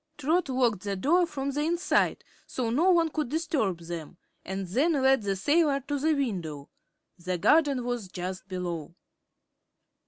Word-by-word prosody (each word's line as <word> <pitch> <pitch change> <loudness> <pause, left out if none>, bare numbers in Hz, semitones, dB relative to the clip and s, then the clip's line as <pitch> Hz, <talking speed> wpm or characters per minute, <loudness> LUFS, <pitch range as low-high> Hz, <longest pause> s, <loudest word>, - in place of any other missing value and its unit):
Trot 310 +3 +1
locked 245 -7 +1
the 200 0 -3
door 340 - +3
from 280 -3 -3
the 290 +2 -2
inside, 340 +3 +1 0.2
so 240 -3 -2
no 320 +10 +3
one 335 -3 +4
could 305 -5 -2
disturb 290 - -1
them, 170 0 -7 0.3
and 190 0 -4
then 285 - +2
led 270 -3 +3
the 200 -1 -1
sailor 290 - +2
to 285 +2 -3
the 310 +2 +2
window. 175 - -3 0.5
The 180 +1 -2
garden 280 - +3
was 245 -5 -3
just 185 +1 -6
below. 175 -4 -5
255 Hz, 155 wpm, -28 LUFS, 185-300 Hz, 0.5 s, one